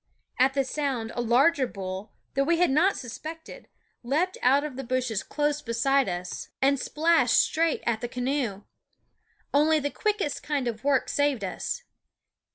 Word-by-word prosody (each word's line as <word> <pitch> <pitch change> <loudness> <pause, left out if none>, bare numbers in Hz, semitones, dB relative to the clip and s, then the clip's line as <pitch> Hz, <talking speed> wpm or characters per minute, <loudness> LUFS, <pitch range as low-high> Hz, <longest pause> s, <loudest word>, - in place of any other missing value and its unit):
At 265 +2 +4
the 275 - +2
sound 260 -5 -2
a 240 - -2
larger 260 +4 +3
bull, 190 0 -6 0.2
that 275 0 +1
we 335 +2 +2
had 350 -4 +3
not 345 +8 +3
suspected, 320 - -8 0.3
leaped 310 +10 0
out 275 +3 +4
of 300 -4 -5
the 270 - -5
bushes 250 -4 -1
close 295 0 -1
beside 250 +1 +1
us 175 0 -5
and 275 0 +3
splashed 300 -3 +2
straight 325 0 +2
at 230 -2 0
the 240 - -2
canoe. 250 -5 -2 0.9
Only 305 +2 +4
the 285 0 -2
quickest 420 -8 -1
kind 285 -4 -2
of 225 -2 -4
work 275 -2 +2
saved 285 -6 +1
us. 485 - -4
270 Hz, 160 wpm, -27 LUFS, 240-300 Hz, 0.9 s, At